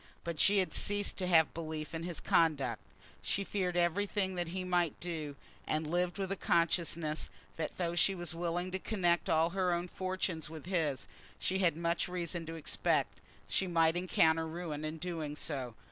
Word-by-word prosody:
But 170 -2 -4
she 200 +5 +5
had 190 -2 +1
ceased 205 0 0
to 185 - -1
have 160 -3 +5
belief 160 -1 -5
in 165 - -3
his 170 -1 -4
conduct. 140 -8 +2 0.4
She 200 - 0
feared 185 -3 -1
everything 190 +2 +1
that 175 -2 -2
he 185 +2 -3
might 175 -4 +1
do, 155 -5 -4 0.3
and 155 +1 0
lived 175 +3 0
with 195 -1 -2
a - - +1
consciousness 165 -3 +1 0.3
that 160 -1 -3
though 170 -2 0
she 175 +3 +3
was 175 -1 -2
willing 175 +2 -2
to 190 - -2
connect 175 -5 +1
all 160 +1 +3
her 185 -1 +1
own 175 +1 0
fortunes 185 -4 -2
with 160 -1 -8
his, 160 -8 0 0.3
she 190 +1 0
had 170 -4 +3
much 170 +1 0
reason 175 -2 -3
to 165 - -5
expect 160 - +1
that - - -15
she 190 - +2
might 165 -1 +3
encounter 165 -2 +3
ruin 160 -2 -4
in 155 +1 -3
doing 160 -3 -3
so. 135 -7 -4
170 Hz, 185 wpm, -33 LUFS, 160-180 Hz, 0.4 s, she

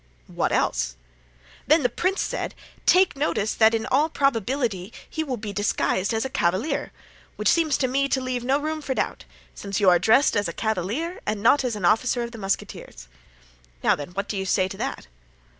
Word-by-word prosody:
"What - - -2
else?" - - 0 0.7
"Then 310 +1 +4
the - - +5
prince 370 - -1
said: - - -4 0.3
'Take 370 -3 +5
notice 270 -7 0
that 220 0 +4
in 225 - -2
all 295 +5 +2
probability 240 - -1 0.2
he 315 - -3
will 265 -5 -3
be 210 -2 -6
disguised 200 -1 0
as 225 +2 -1
a - - 0
cavalier;' 190 - 0 0.4
which - - -2
seems 320 -4 +3
to 260 - +1
me 275 +2 0
to 265 - +1
leave 255 -2 -3
no 265 +3 +2
room 310 +1 -3
for 270 -3 -3
doubt, - - -2 0.3
since 200 -1 -4
you 195 -3 +5
are 175 - +4
dressed 225 +10 +4
as 205 -1 +1
a - - -5
cavalier 220 - -2
and 210 -1 -2
not 270 +4 +5
as 245 -3 -1
an 200 -4 -3
officer 240 +5 +2
of 235 0 -7
musketeers. 195 - -4 0.8
Now - - +4
then, 145 - -7
what 200 +2 -3
do 205 - -3
you 190 - -2
say 185 0 +2
to 195 - -8
that?" - - -4
230 Hz, 195 wpm, -24 LUFS, 200-275 Hz, 0.8 s, the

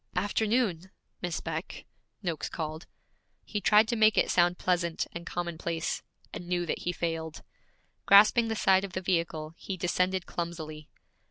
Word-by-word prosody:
'Afternoon, 205 -2 0 0.3
Miss 175 -3 -3
Beck,' 160 +1 -5 0.4
Noakes 170 -4 -2
called. 160 0 -5 0.6
He 210 - -3
tried 215 +2 +5
to 240 - +1
make 220 -1 +4
it - - +3
sound 175 0 +3
pleasant 175 -2 0
and 170 +1 -8
commonplace, 170 -1 -3 0.3
and 175 - -7
knew 175 -1 0
that 160 - -2
he 175 - -2
failed. 165 -2 -4 0.6
Grasping 215 +4 +7
the 225 - -1
side 190 -2 +4
of 195 -2 -6
the 185 - -2
vehicle, 165 -4 -1
he 190 - -5
descended 180 +1 0
clumsily. 155 -3 -6
175 Hz, 150 wpm, -29 LUFS, 165-195 Hz, 0.6 s, Grasping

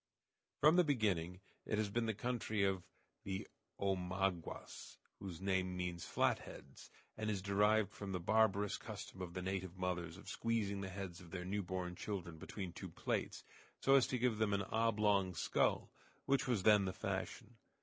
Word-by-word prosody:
From 155 +4 +7
the 180 - +7
beginning 95 - +1 0.2
it 105 - -1
has 105 -2 0
been 115 +1 +1
the 110 - 0
country 110 -3 -1
of 95 -2 +2 0.4
the 95 -1 -3 0.3
Omaguas, 95 -2 -2 0.2
whose 95 -4 -6
name 95 -1 0
means 90 -1 -3
"flat - - +2
heads," - - -11 0.3
and 110 0 -2
is 100 -2 0
derived 105 +1 +3
from 100 -1 -5
the 90 - -1
barbarous 105 +1 +3
custom 95 - -7
of 90 -1 -5
the 95 - -3
native 95 -1 -3
mothers 90 -2 -2
of 100 - -13
squeezing 105 -4 0
the 95 - -4
heads 95 -2 -6
of 90 - -12
their 90 +1 -5
newborn 95 -2 -2
children 90 -3 -5
between 95 -1 -5
two - - -7
plates, - - -2 0.4
so 135 - +4
as 135 -2 +6
to 130 - 0
give 120 -3 +1
them 110 -2 +2
an 100 - 0
oblong 105 -4 +3
skull, - - +1 0.3
which 140 0 +2
was 115 -7 +1
then 105 -1 +6
the 95 - -2
fashion. - - -4
100 Hz, 170 wpm, -38 LUFS, 90-110 Hz, 0.4 s, From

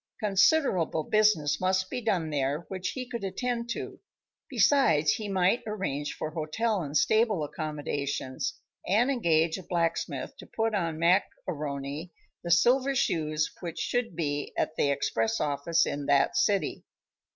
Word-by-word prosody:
Considerable 200 - +2
business 190 -8 +2
must 185 0 +1
be 250 - -3
done 185 -9 0
there 140 +1 0
which 185 -1 -3
he 255 -2 -5
could 235 -3 -5
attend 235 +5 -2
to, 235 - -5 0.5
besides, 160 - +4
he 210 -2 -3
might 190 +4 +2
arrange 150 -9 -3
for 155 - -4
hotel 190 +7 -1
and 150 -1 -1
stable 215 -2 +2
accommodations, 145 -3 -3 0.3
and 230 +8 +3
engage 165 -8 +2
a - - -10
blacksmith 170 -1 -2
to - - -12
put 225 0 -1
on 165 -6 -1
Mac 175 +4 +3 0.2
A'Rony 145 0 -4 0.3
the 170 - -4
silver 255 +10 +4
shoes 155 -8 0
which 170 -2 -6
should 245 -7 -1
be 145 -3 -2
at - - -1
the 140 - +1
express 115 -5 0
office 150 +3 +1
in 145 0 -4
that 140 -1 +3
city. 195 +8 +1
170 Hz, 145 wpm, -28 LUFS, 150-215 Hz, 0.5 s, besides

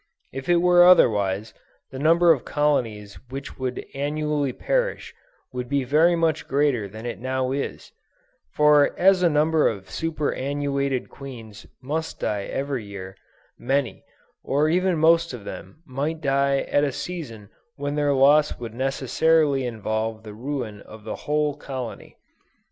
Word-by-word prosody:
If 135 +3 -6
it 175 - +5
were 175 0 +6
otherwise, 105 - +4 0.4
the 130 - -7
number 165 +3 +5
of 140 -7 +1
colonies 115 -9 -1
which 135 +1 -8
would 130 -1 -3
annually 145 0 -1
perish, - - -2 0.4
would 125 -1 -5
be 140 -1 +1
very 155 +7 +3
much 165 -2 0
greater 135 -7 +1
than 110 +4 -10
it 120 -5 -5
now 130 +1 -2
is; 140 +1 -4 0.6
for 150 -1 +4
as 190 0 +4
a 175 - +4
number 155 +1 +3
of 100 -3 -4
superannuated 140 -4 -2
queens 115 -6 -11 0.2
must 160 +4 -3
die 100 -2 -2
every 135 -3 -3
year, 95 -2 -9 0.4
many, 135 0 -1 0.4
or 145 +3 +1
even 180 +1 +2
most 165 0 +3
of 105 -5 -11
them 155 - -9
might 145 +4 -3
die 140 -1 +1
at 145 - +1
a 145 - +1
season 120 - -7 0.2
when 145 0 -3
their 145 -1 +1
loss 145 +3 +4
would 115 -2 -7
necessarily 135 +2 +1
involve 110 -1 -3
the 105 -1 -9
ruin 120 -3 -5
of 110 0 -13
their 110 - -5
whole 150 -1 -1
colony. 130 -5 -7
140 Hz, 145 wpm, -24 LUFS, 120-150 Hz, 0.6 s, were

